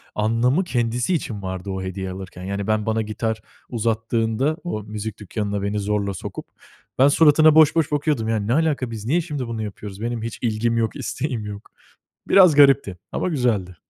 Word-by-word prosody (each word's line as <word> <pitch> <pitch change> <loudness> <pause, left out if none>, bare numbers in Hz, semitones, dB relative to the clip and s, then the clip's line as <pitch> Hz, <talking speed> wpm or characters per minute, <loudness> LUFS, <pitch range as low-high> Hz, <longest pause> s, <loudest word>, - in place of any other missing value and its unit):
anlamı 115 - +2
kendisi 120 -1 -1
için 115 - -3
vardı 95 +1 -5
o 95 -1 -3
hediye 95 0 -4
alırken. 90 -1 -8
Yani 100 +1 -3
ben 110 -1 +1
bana 110 0 0
gitar 110 +1 -3 0.3
uzattığında 115 +5 0
o 110 -12 -4
müzik 105 0 -6
dükkânına 100 0 -3
beni 100 +1 -1
zorla 100 -1 -1
sokup, - - -7 0.5
ben 135 - +7
suratına 155 +1 +5
boş 160 0 +6
boş 160 -3 +1
bakıyordum. 145 -6 0
Yani 110 -2 -1
"Ne 120 - +2
alaka? 145 -6 +1
Biz 110 -2 -6
niye 165 +9 +2
şimdi 145 -6 -4
bunu 115 -1 -4
yapıyoruz? 105 -1 -8
Benim 120 -1 -2
hiç 115 - -5
ilgim 115 0 0
yok, 115 -1 0
isteğim 125 -6 -3
yok." 105 0 -8 0.6
Biraz 180 -6 +6
garipti 135 -10 +5
ama - - -1
güzeldi. 115 - 0
115 Hz, 175 wpm, -22 LUFS, 105-135 Hz, 0.6 s, ben